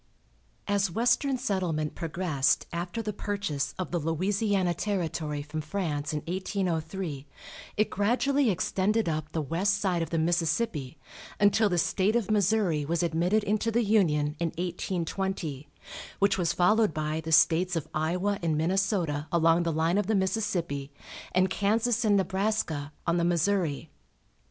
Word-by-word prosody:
As 200 Hz, -1 st, +1 dB
western 245 Hz, +7 st, +1 dB
settlement 180 Hz, -, -1 dB
progressed 165 Hz, -4 st, 0 dB
after 175 Hz, +6 st, -3 dB
the 210 Hz, -1 st, -3 dB
purchase 200 Hz, -9 st, -3 dB
of 185 Hz, -, -4 dB
the 175 Hz, -, 0 dB
Louisiana 185 Hz, +3 st, 0 dB
territory 160 Hz, -6 st, -2 dB
from 155 Hz, +1 st, -5 dB
France 155 Hz, -3 st, -3 dB
in 150 Hz, -1 st, -2 dB
1803, 175 Hz, -4 st, -3 dB, 0.5 s
it 215 Hz, -, +1 dB
gradually 250 Hz, +6 st, +2 dB
extended 200 Hz, +2 st, 0 dB
up 155 Hz, -1 st, -2 dB
the 160 Hz, -, -2 dB
west 185 Hz, +7 st, +1 dB
side 185 Hz, -4 st, 0 dB
of 165 Hz, -, -2 dB
the 165 Hz, -, -1 dB
Mississippi, 165 Hz, -, 0 dB, 0.4 s
until 205 Hz, +1 st, +4 dB
the 175 Hz, -, 0 dB
State 190 Hz, +5 st, +1 dB
of 220 Hz, -3 st, 0 dB
Missouri 200 Hz, -6 st, +2 dB
was 170 Hz, +4 st, -1 dB
admitted 175 Hz, +6 st, +1 dB
into 215 Hz, +2 st, 0 dB
the 235 Hz, +1 st, +1 dB
Union, 155 Hz, -9 st, +2 dB
in 170 Hz, -, +1 dB
1820, 175 Hz, -4 st, -3 dB, 0.5 s
which 200 Hz, 0 st, +3 dB
was 175 Hz, -3 st, +1 dB
followed 210 Hz, +1 st, +3 dB
by 155 Hz, +1 st, -2 dB
the 160 Hz, -, -4 dB
States 175 Hz, +3 st, +4 dB
of 165 Hz, -, -2 dB
Iowa 180 Hz, +6 st, 0 dB
and 160 Hz, -3 st, 0 dB
Minnesota, 170 Hz, -3 st, 0 dB
along 165 Hz, 0 st, +4 dB
the 170 Hz, -1 st, 0 dB
line 165 Hz, +5 st, +1 dB
of 205 Hz, -, -1 dB
the 220 Hz, -, +2 dB
Mississippi, 175 Hz, -8 st, -1 dB, 0.4 s
and 185 Hz, +1 st, +3 dB
Kansas 220 Hz, +5 st, +1 dB
and 205 Hz, -2 st, +4 dB
Nebraska, 190 Hz, -6 st, -1 dB
on 170 Hz, 0 st, +1 dB
the 170 Hz, -, +1 dB
Missouri. 170 Hz, -3 st, 0 dB
180 Hz, 145 wpm, -28 LUFS, 160-205 Hz, 0.5 s, until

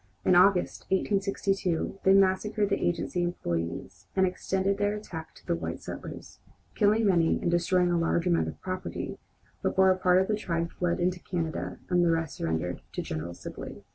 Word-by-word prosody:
In -, -, +5 dB
August, 180 Hz, +1 st, +4 dB
1862, 195 Hz, -2 st, 0 dB
they 190 Hz, -, +6 dB
massacred 195 Hz, +2 st, +2 dB
the 200 Hz, -, 0 dB
agency 175 Hz, +1 st, 0 dB
employees 85 Hz, -, -3 dB
and 190 Hz, -1 st, +4 dB
extended 190 Hz, +2 st, -1 dB
their 205 Hz, 0 st, +1 dB
attack 170 Hz, -6 st, -8 dB
to -, -, -18 dB
the -, -, 0 dB
white 85 Hz, 0 st, -4 dB
settlers, -, -, -8 dB, 0.3 s
killing 215 Hz, +2 st, +3 dB
many 170 Hz, -4 st, +3 dB
and 170 Hz, -, 0 dB
destroying 175 Hz, +1 st, +2 dB
a 170 Hz, -, +2 dB
large 165 Hz, +1 st, +1 dB
amount 175 Hz, -2 st, +2 dB
of -, -, -7 dB
property, 185 Hz, 0 st, -5 dB, 0.4 s
before 190 Hz, 0 st, +4 dB
a 185 Hz, -, +1 dB
part 180 Hz, 0 st, +4 dB
of 190 Hz, -, +1 dB
the 215 Hz, -, +1 dB
tribe 170 Hz, -5 st, -2 dB
fled 175 Hz, -1 st, -1 dB
into 180 Hz, 0 st, 0 dB
Canada 165 Hz, -3 st, -3 dB
and 175 Hz, -1 st, +3 dB
the 170 Hz, -, +3 dB
rest 165 Hz, -2 st, -1 dB
surrendered 80 Hz, +2 st, -2 dB
to -, -, -3 dB
General 80 Hz, +2 st, -5 dB
Sibley. -, -, -8 dB
180 Hz, 175 wpm, -28 LUFS, 165-195 Hz, 0.4 s, they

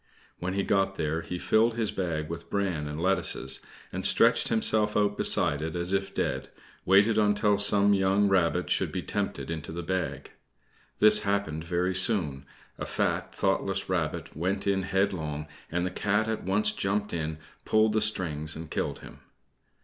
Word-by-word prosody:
When 90 Hz, +2 st, -3 dB
he 100 Hz, -, 0 dB
got 95 Hz, 0 st, +1 dB
there 80 Hz, -1 st, -2 dB
he 90 Hz, -, -5 dB
filled 115 Hz, +5 st, +2 dB
his 110 Hz, -3 st, 0 dB
bag 85 Hz, -7 st, -3 dB
with 85 Hz, +1 st, -7 dB
bran 95 Hz, -7 st, -2 dB
and 75 Hz, +1 st, -6 dB
lettuces, 85 Hz, -7 st, +2 dB, 0.3 s
and -, -, -4 dB
stretching -, -, +3 dB
himself 110 Hz, -1 st, +1 dB
out 105 Hz, -1 st, +1 dB
beside 70 Hz, -6 st, +3 dB
it 80 Hz, +1 st, -4 dB
as 85 Hz, +2 st, -1 dB
if 95 Hz, 0 st, -1 dB
dead, -, -, -2 dB, 0.4 s
waited 100 Hz, +4 st, +4 dB
until 105 Hz, -1 st, +2 dB
some 100 Hz, 0 st, +3 dB
young 100 Hz, +1 st, +2 dB
rabbit 90 Hz, -4 st, +1 dB
should -, -, +1 dB
be -, -, -4 dB
tempted -, -, -3 dB
into 80 Hz, -1 st, -5 dB
the 85 Hz, +1 st, -5 dB
bag. 80 Hz, -6 st, -3 dB, 0.7 s
This 105 Hz, 0 st, +7 dB
happened 100 Hz, -6 st, -2 dB
very 90 Hz, +2 st, -1 dB
soon. 90 Hz, -, 0 dB, 0.3 s
A -, -, -3 dB
fat, -, -, -2 dB
thoughtless -, -, -1 dB
rabbit -, -, -2 dB
went 95 Hz, +5 st, -2 dB
in 100 Hz, -1 st, +1 dB
headlong, 90 Hz, -6 st, -1 dB, 0.3 s
and 90 Hz, +2 st, -1 dB
the 90 Hz, -, -3 dB
Cat 105 Hz, +3 st, 0 dB
at 110 Hz, -1 st, -3 dB
once 105 Hz, +3 st, +2 dB
jumped 105 Hz, +1 st, -2 dB
up, 80 Hz, -2 st, -2 dB, 0.3 s
pulled 110 Hz, 0 st, +2 dB
the 110 Hz, -, +1 dB
strings 80 Hz, -8 st, 0 dB
and 80 Hz, -1 st, -9 dB
killed -, -, -3 dB
him. -, -, -12 dB
95 Hz, 170 wpm, -27 LUFS, 80-105 Hz, 0.7 s, This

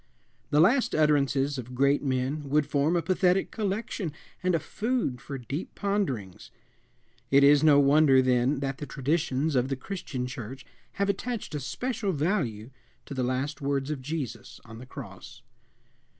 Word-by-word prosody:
The 150 Hz, -, +3 dB
last 240 Hz, -, +4 dB
utterances 145 Hz, -2 st, +2 dB
of 125 Hz, +1 st, -8 dB
great 140 Hz, +2 st, +3 dB
men 135 Hz, +2 st, -2 dB
would 150 Hz, +1 st, +3 dB
form 145 Hz, +4 st, +1 dB
a 170 Hz, -, +1 dB
pathetic 185 Hz, +1 st, +2 dB
collection 200 Hz, -4 st, -3 dB, 0.3 s
and 180 Hz, -1 st, +2 dB
a -, -, +1 dB
food 220 Hz, -, -2 dB
for 140 Hz, -, -6 dB
deep 135 Hz, +7 st, -6 dB
ponderings. 155 Hz, -, -2 dB, 0.8 s
It 140 Hz, +1 st, +5 dB
is 145 Hz, +1 st, +6 dB
no 150 Hz, -2 st, +7 dB
wonder, 140 Hz, -1 st, +5 dB
then, 130 Hz, +2 st, +2 dB
that 135 Hz, -1 st, -3 dB
the 145 Hz, -, -5 dB
traditions 150 Hz, +1 st, 0 dB
of 125 Hz, 0 st, +2 dB
the 135 Hz, -, -1 dB
Christian 130 Hz, -4 st, -5 dB
Church 125 Hz, 0 st, -7 dB, 0.3 s
have 200 Hz, -, 0 dB
attached 215 Hz, 0 st, -3 dB
a 150 Hz, -, -2 dB
special 205 Hz, -, -2 dB
value 140 Hz, -, -1 dB, 0.3 s
to -, -, -7 dB
the 130 Hz, -, -2 dB
last 130 Hz, +4 st, -2 dB
words 140 Hz, 0 st, -1 dB
of 145 Hz, -3 st, -4 dB
Jesus 140 Hz, -4 st, -5 dB
on 115 Hz, -1 st, -11 dB
the 125 Hz, -, -11 dB
cross. -, -, -10 dB
145 Hz, 160 wpm, -27 LUFS, 130-170 Hz, 0.8 s, no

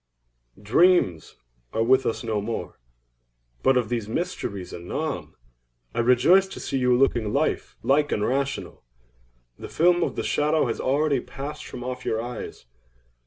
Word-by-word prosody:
Dreams 105 Hz, -, +3 dB, 0.4 s
are 115 Hz, -, +1 dB
with 130 Hz, +3 st, +3 dB
us 115 Hz, -, -2 dB
no 110 Hz, -3 st, -1 dB
more; 115 Hz, +2 st, -5 dB, 0.8 s
but 135 Hz, -1 st, +4 dB
of 120 Hz, -4 st, 0 dB
these 115 Hz, -3 st, -2 dB
mysteries 105 Hz, -, -4 dB
anon. 140 Hz, -, -4 dB, 0.6 s
I -, -, -2 dB
rejoice 125 Hz, +11 st, +5 dB
to 190 Hz, -, -9 dB
see 135 Hz, -, -2 dB
you 125 Hz, -1 st, +3 dB
looking 120 Hz, -5 st, +2 dB
life 145 Hz, +5 st, -1 dB
like 145 Hz, +2 st, +2 dB
and 105 Hz, -, 0 dB
rational. 140 Hz, +1 st, -2 dB, 0.8 s
The -, -, -8 dB
film 175 Hz, +2 st, +3 dB
of -, -, -1 dB
the -, -, -2 dB
shadow 150 Hz, +1 st, +1 dB
has 115 Hz, -, -2 dB
already 140 Hz, +1 st, +1 dB
passed 145 Hz, +4 st, -7 dB
from 125 Hz, -, -7 dB
off 125 Hz, 0 st, -5 dB
your 110 Hz, -, -1 dB
eyes. 120 Hz, -, -7 dB
130 Hz, 150 wpm, -25 LUFS, 115-150 Hz, 0.8 s, rejoice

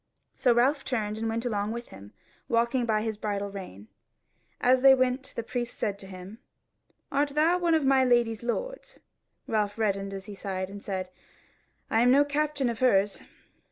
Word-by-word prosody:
So 250 Hz, -, +2 dB
Ralph 260 Hz, +5 st, +3 dB
turned, 215 Hz, -4 st, -2 dB
and 225 Hz, 0 st, -1 dB
went 230 Hz, +2 st, -2 dB
along 210 Hz, -2 st, -1 dB
with 235 Hz, +1 st, -7 dB
him, 100 Hz, +1 st, -12 dB, 0.4 s
walking 235 Hz, +1 st, +1 dB
by 215 Hz, -1 st, +1 dB
his 220 Hz, -2 st, -3 dB
bridle 205 Hz, -1 st, -3 dB
rein. 110 Hz, -, -9 dB, 0.7 s
And 245 Hz, -, +3 dB
as 255 Hz, 0 st, +4 dB
they 270 Hz, 0 st, +8 dB
went 255 Hz, +1 st, 0 dB
the 235 Hz, -, -3 dB
priest 240 Hz, 0 st, -4 dB
said 200 Hz, -2 st, -2 dB
to 195 Hz, -, -11 dB
him: 190 Hz, +3 st, -10 dB, 0.7 s
"Art 285 Hz, +1 st, +1 dB
thou 330 Hz, +4 st, +3 dB
one 340 Hz, -2 st, +2 dB
of 310 Hz, -3 st, +1 dB
my 265 Hz, -1 st, +4 dB
lady's 240 Hz, -3 st, +2 dB
lords?" -, -, -4 dB, 0.5 s
Ralph 210 Hz, -2 st, -1 dB
reddened 195 Hz, -3 st, -1 dB
as 195 Hz, -1 st, -7 dB
he 210 Hz, -, -8 dB
sighed, 190 Hz, -1 st, -4 dB
and 200 Hz, 0 st, -9 dB
said: 185 Hz, -2 st, -4 dB, 0.8 s
"I 225 Hz, -, +3 dB
am 245 Hz, -, +5 dB
no 280 Hz, +3 st, +5 dB
captain 290 Hz, -2 st, 0 dB
of 235 Hz, -2 st, -3 dB
hers." 205 Hz, -6 st, +2 dB
230 Hz, 185 wpm, -27 LUFS, 200-260 Hz, 0.8 s, they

